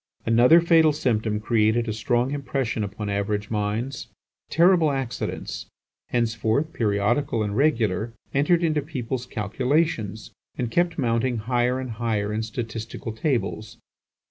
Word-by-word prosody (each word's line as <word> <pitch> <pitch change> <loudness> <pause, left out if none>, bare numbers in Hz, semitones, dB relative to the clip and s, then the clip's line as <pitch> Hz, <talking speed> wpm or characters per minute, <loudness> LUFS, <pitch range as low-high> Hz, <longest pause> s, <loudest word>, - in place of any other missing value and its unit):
Another 120 +8 +6
fatal 165 -2 +5
symptom 110 -6 0
created 110 +1 +2
a 110 - -1
strong 120 +4 0
impression 135 -5 -2
upon 105 +1 -5
average 100 +1 -2
minds. 110 +5 -2 0.4
Terrible 170 -1 +4
accidents, 135 -4 -4 0.4
henceforth 115 +5 0
periodical 110 +4 +1
and 105 -1 -3
regular, 115 -7 +1 0.2
entered 165 +5 +3
into 155 -2 +1
people's 130 -4 -4
calculations, 110 - -1 0.3
and 120 -2 -2
kept 175 +4 +1
mounting 120 -2 +1
higher 120 +3 0
and 130 -2 -5
higher 105 -2 -1
in 110 - -1
statistical 115 0 -5
tables. 110 -3 -2
120 Hz, 120 wpm, -24 LUFS, 110-140 Hz, 0.4 s, Another